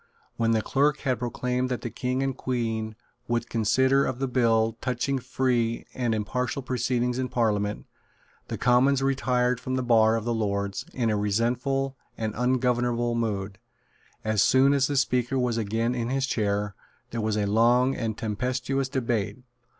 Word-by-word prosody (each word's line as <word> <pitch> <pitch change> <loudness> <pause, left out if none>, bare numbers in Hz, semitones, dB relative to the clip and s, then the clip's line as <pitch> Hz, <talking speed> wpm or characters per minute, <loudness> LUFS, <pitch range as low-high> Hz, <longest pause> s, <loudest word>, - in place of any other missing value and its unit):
When 115 -1 +1
the 110 -1 +2
Clerk 145 +2 +1
had 130 -3 0
proclaimed 125 +1 -1
that 125 - -2
the 120 - -5
King 125 +3 -1
and 135 -1 -1
Queen 115 -4 -2 0.3
would 120 0 -1
consider 130 +5 +3
of 130 - -2
the 135 +1 -1
bill 115 -3 +2
touching 130 +2 -1
free 120 -2 0
and 120 -3 0
impartial 125 +5 -2
proceedings 125 0 -1
in 130 -1 -1
Parliament, 105 -3 0 0.6
the - - -4
Commons 130 +2 +3
retired 125 -2 +1
from 130 +1 -3
the 130 - -1
bar 115 -2 +4
of 115 -1 -3
the 120 - 0
Lords 100 -2 -2
in 115 -3 +1
a - - +1
resentful 125 +6 0 0.2
and 110 -1 -2
ungovernable 120 -1 +1
mood. 105 -4 -2 0.6
As 110 -1 +1
soon 135 +2 +5
as 135 -1 +3
the 145 - -2
Speaker 125 0 +1
was 125 -2 0
again 115 +3 0
in 120 -1 -2
his 135 0 0
chair 105 -4 -1 0.4
there 115 - -2
was 110 0 0
a 105 - +1
long 120 +5 +3
and 110 -3 -3
tempestuous 125 +5 -2
debate. 120 -7 -1
120 Hz, 165 wpm, -26 LUFS, 110-130 Hz, 0.6 s, soon